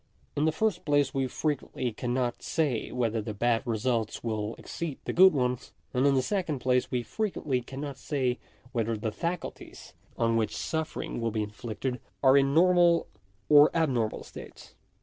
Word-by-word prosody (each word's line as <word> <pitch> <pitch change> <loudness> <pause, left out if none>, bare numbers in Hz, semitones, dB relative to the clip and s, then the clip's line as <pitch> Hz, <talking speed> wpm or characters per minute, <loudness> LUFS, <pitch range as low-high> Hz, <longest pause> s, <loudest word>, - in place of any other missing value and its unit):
In 145 - +1
the 160 - +3
first 185 +2 0
place 145 -2 +2
we 135 -1 0
frequently 130 -3 -2
cannot 120 +2 -2
say 145 -8 -1
whether 115 -3 0
the 105 0 -5
bad 115 +2 +2
results 115 -1 -1
will 110 -1 -2
exceed 160 -5 -5
the - - -2
good 190 +1 +8
ones; 125 -3 -1 0.2
and 130 +3 +3
in 140 - +4
the 130 - +2
second 180 -4 -1
place 125 0 +1
we 125 -2 -1
frequently 150 - -2
cannot 135 +2 -7
say 130 -4 -1 0.3
whether 115 -2 -1
the 110 +1 -2
faculties 170 +9 -5 0.2
on 115 0 +2
which 110 -1 0
suffering 160 -6 -3
will 115 - +1
be 110 -1 -1
inflicted, 115 +4 -4 0.2
are 130 0 +7
in 140 0 +4
normal 175 +1 +4 0.4
or 150 0 +8
abnormal 125 -9 0
states. - - -12
130 Hz, 165 wpm, -28 LUFS, 115-150 Hz, 0.4 s, good